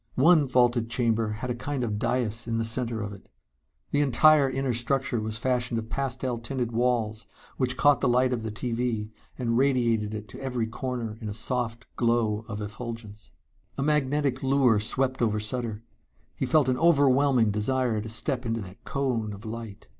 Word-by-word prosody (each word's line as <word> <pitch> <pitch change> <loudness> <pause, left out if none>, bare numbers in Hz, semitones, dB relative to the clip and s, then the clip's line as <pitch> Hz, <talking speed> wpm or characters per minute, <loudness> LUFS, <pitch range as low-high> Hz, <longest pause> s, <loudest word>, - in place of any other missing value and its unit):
One 155 +1 +5
vaulted 120 -2 +2
chamber 115 -2 +1
had 125 +4 -4
a - - 0
kind 130 +2 -3
of 105 -3 -2
dais 115 -1 -1
in 115 -1 -1
the 115 - 0
center 115 -1 -2
of 100 -1 -5
it. 100 - -14 0.6
The 145 - +2
entire 145 +1 +5
inner 135 -1 -1
structure 120 0 0
was 110 0 -3
fashioned 125 0 0
of 110 0 -4
pastel 130 -3 -2
tinted 120 0 -3
walls 115 -2 0 0.3
which 130 -1 0
caught 145 -1 +4
the - - +2
light 125 +1 +3
of 120 - -2
the 110 -1 -4
TV 115 -1 -2 0.3
and 120 -2 0
radiated 115 -6 +1
it 105 0 -7
to - - -10
every 125 -4 -1
corner 115 -1 -4
in 110 - -4
a 100 - -5
soft 120 +1 -2
glow 115 -2 +1
of 105 -2 -5
effulgence. 110 -1 -7 0.5
A 135 - 0
magnetic 145 -2 +1
lure 130 -5 +3
swept 130 +4 0
over 110 -2 +1
Sutter. 110 0 -3 0.5
He 135 - -2
felt 145 +1 +4
an 125 -1 +1
overwhelming 140 -7 +4
desire 110 +1 0
to 110 - -7
step 125 +3 -2
into 115 -1 -2
that 95 -1 -11
cone 125 -6 -1
of 100 +3 -11
light.... 110 -2 -7
120 Hz, 180 wpm, -27 LUFS, 110-130 Hz, 0.6 s, One